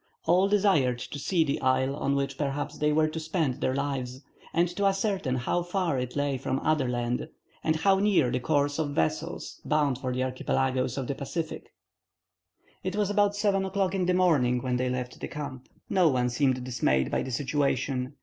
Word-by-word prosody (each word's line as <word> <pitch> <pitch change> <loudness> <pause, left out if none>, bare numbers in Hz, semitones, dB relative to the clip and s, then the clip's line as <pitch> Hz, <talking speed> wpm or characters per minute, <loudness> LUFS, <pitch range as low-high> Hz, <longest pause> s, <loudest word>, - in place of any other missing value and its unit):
All 180 +4 +4
desired 190 -12 +3
to 140 +4 -6
see 170 +3 +2
the 140 -2 -2
isle 130 +1 +2
on 140 -1 0
which 140 0 -1
perhaps 145 +1 -2
they 150 0 +2
were 155 +1 +3
to 155 +1 -4
spend 155 -4 -1
their 130 - +1
lives, 135 -2 -3 0.3
and 170 +2 +2
to 200 +3 -2
ascertain 195 - 0
how 130 +7 0
far 175 -5 -1
it 125 0 -4
lay 145 -2 0
from 130 0 -1
other 150 -5 +1
land, 120 +3 -2 0.3
and 155 - +2
how 195 +4 +3
near 195 -11 +3
the 125 - 0
course 145 +2 +1
of 145 -2 -1
vessels 80 - -2
bound 145 -4 +1
for 130 -2 -3
the 130 +1 -1
archipelagoes 130 0 -1
of 135 - -2
the 140 - -2
Pacific. 160 +4 -5 1.1
It 185 +1 -2
was 205 -1 +1
about 205 0 +2
7 200 -2 +1
o'clock 190 -1 0
in 185 -2 0
the 180 - +3
morning 135 -9 +3
when 125 -1 0
they 125 0 0
left 125 0 -4
the - - -4
camp. 130 -4 -7 0.2
No 185 -3 +3
one 125 -2 +1
seemed 130 -1 +1
dismayed 65 - +1
by - - +1
the - - -4
situation. 135 0 -1
140 Hz, 195 wpm, -28 LUFS, 130-175 Hz, 1.1 s, All